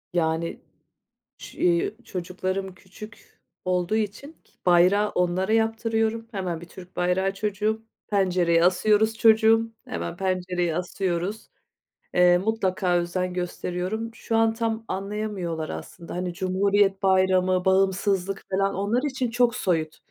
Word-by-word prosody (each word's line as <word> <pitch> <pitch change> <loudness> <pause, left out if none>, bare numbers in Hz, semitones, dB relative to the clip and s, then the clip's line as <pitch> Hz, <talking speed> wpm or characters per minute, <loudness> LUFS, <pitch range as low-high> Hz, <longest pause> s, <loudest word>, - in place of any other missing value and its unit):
Yani, 165 -1 -1 0.8
ç - - -11
eee, 175 +4 +1
çocuklarım 185 0 -4
küçük 205 +4 -14 0.3
olduğu 180 +2 0
için 220 +8 -3 0.3
bayrağı 185 +4 +4
onlara 180 +2 0
yaptırıyorum. 225 0 0
Hemen 185 -6 -3
bir - - -9
Türk 185 +1 -13
bayrağı 185 +2 +1
çocuğum. 210 +2 -1 0.3
Pencereye 180 -4 +2
asıyoruz 210 +5 +3
çocuğum, 225 +1 +4
hemen 85 0 -5
pencereye 180 -3 -1
asıyoruz. 180 +3 -3 0.6
Eee, 180 0 +5
mutlaka 190 -3 0
özen 180 +1 -2
gösteriyorum. 180 +5 -3
Şu 225 - -3
an 225 0 +3
tam 225 0 -2
anlayamıyorlar 195 -5 -3
aslında. 80 - -8
Hani, 180 0 -3
Cumhuriyet 195 +2 +1
Bayramı, 185 -1 +3
bağımsızlık 195 0 +1
falan 195 +1 +1
onlar 205 +7 0
için 260 -2 -2
çok 240 0 +2
soyut. 160 -4 -1
190 Hz, 115 wpm, -25 LUFS, 180-215 Hz, 0.8 s, Eee